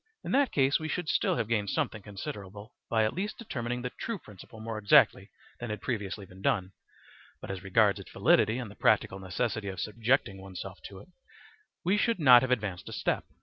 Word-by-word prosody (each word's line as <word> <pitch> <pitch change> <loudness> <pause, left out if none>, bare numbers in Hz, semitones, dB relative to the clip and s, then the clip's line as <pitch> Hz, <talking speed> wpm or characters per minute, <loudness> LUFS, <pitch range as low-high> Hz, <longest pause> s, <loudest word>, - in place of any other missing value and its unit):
In - - -4
that 275 +1 +3
case 140 +1 +3
we 155 - -4
should 170 +2 -3
still - - +2
have 110 - -1
gained 105 -3 0
something 105 - -1
considerable 100 +2 -8 0.2
by 110 -1 +3
at 110 - 0
least 205 +4 -3
determining 125 - -4
the 125 - -3
true 230 -2 -4
principle 105 - -13
more 110 0 -4
exactly 105 -1 +5 0.3
than 120 - -5
had 105 - -3
previously 105 -4 -4
been 95 +1 -15
done; 95 -2 0 0.7
but - - -6
as 95 -2 -5
regards 95 -1 +3
its - - -11
validity 110 +3 +3
and 120 -5 -5
the - - -13
practical 95 - +2
necessity 100 +3 -2
of 95 -2 -5
subjecting 110 -2 0
oneself 95 0 -8
to 95 -2 -9
it, - - -17 0.8
we 190 +4 +3
should 230 +2 +2
not 125 -5 +8
have 130 - -1
advanced 100 -8 -2
a - - -7
step. - - -1
110 Hz, 200 wpm, -29 LUFS, 100-125 Hz, 0.8 s, not